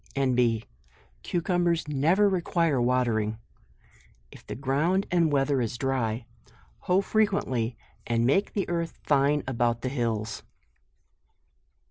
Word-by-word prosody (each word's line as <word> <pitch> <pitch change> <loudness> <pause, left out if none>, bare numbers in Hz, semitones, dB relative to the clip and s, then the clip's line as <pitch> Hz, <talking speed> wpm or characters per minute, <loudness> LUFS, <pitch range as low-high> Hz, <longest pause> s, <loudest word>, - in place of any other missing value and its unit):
N. 135 -2 +1
B. 115 -3 +1 0.6
Cucumbers 175 -2 0
never 160 +8 +3
require 170 -7 +1
watering; 120 -3 +1 0.9
If - - -14
the - - -7
ground 150 +9 +1
and 170 -3 +3
weather 135 -1 +2
is 120 0 -3
dry, 120 -3 -1 0.5
hoe 185 +2 +2
fre 215 +2 +1
JUNE. 215 - +5
H£ - - -9
quently 120 -2 -2 0.3
and 115 0 +1
make 195 +11 +2
the 200 - -1
earth 170 -1 -3
fine 145 +1 +2
about 120 -2 0
the 130 - -2
hills. 115 -5 -2
135 Hz, 130 wpm, -27 LUFS, 120-170 Hz, 0.9 s, JUNE